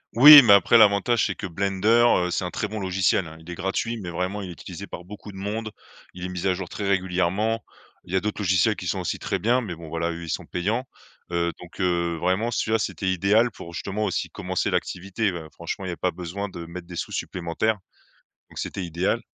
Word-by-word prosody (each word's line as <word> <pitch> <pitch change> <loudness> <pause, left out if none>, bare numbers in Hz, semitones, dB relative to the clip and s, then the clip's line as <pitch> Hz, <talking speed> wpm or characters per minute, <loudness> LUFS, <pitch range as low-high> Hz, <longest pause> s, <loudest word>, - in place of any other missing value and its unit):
Oui, 145 +4 +12
mais 115 -6 +6
après 100 +4 +6
l'avantage, 110 +2 +4
c'est - - -3
que - - -6
Blender, 95 +2 -2 0.4
heu, 90 - -2
c'est - - -1
un 90 - -2
très - - -3
bon 110 - -5
logiciel, 95 -1 +1
hein. 80 0 -11
Il 80 - -17
est - - -4
gratuit, 95 +6 -2
mais 95 -5 -6
vraiment 90 +4 -3
il 95 - -6
est - - -6
utilisé 80 - -9
par 85 - -8
beaucoup 105 +2 -10
de 95 - -12
monde, 105 +3 -3 0.5
il 90 0 -6
est - - -4
mis 90 +1 -3
à 95 - +2
jour 90 0 -5
très 100 +2 -4
régulièrement. 95 +4 0 0.4
Il 90 - -9
y - - +2
a - - +4
d'autres 105 +2 -3
logiciels 95 -3 +3
qui - - -6
sont - - -1
aussi - - -3
très - - -1
bien, 120 +4 +2
mais 100 -7 -5
bon 80 0 -10
voilà, 85 +2 -2
eux 85 0 -7
ils 85 - -7
sont - - -3
payants, 110 +8 -2 0.4
heu, 85 0 0
donc 85 - -13
heu, 85 -2 +1
vraiment, 95 +7 0
celui-là, 115 -1 0
c'était 105 -2 -3
idéal 105 +6 +3
pour 85 - -10
justement 100 +4 -3
aussi 95 - -2
commencer - - -2
l'activité. 100 +3 -1
Bah 85 -3 -7
franchement, 95 - -5
il - - -3
y - - -2
a 85 - -6
pas 90 - 0
besoin 90 +4 -5
de 85 -2 -8
mettre 85 +1 -9
des 90 - -9
sous - - -4
supplémentaires, 90 +5 -1 0.7
donc - - -9
c'était 95 - -4
idéal. 85 +7 0
95 Hz, 240 wpm, -24 LUFS, 85-105 Hz, 0.7 s, Oui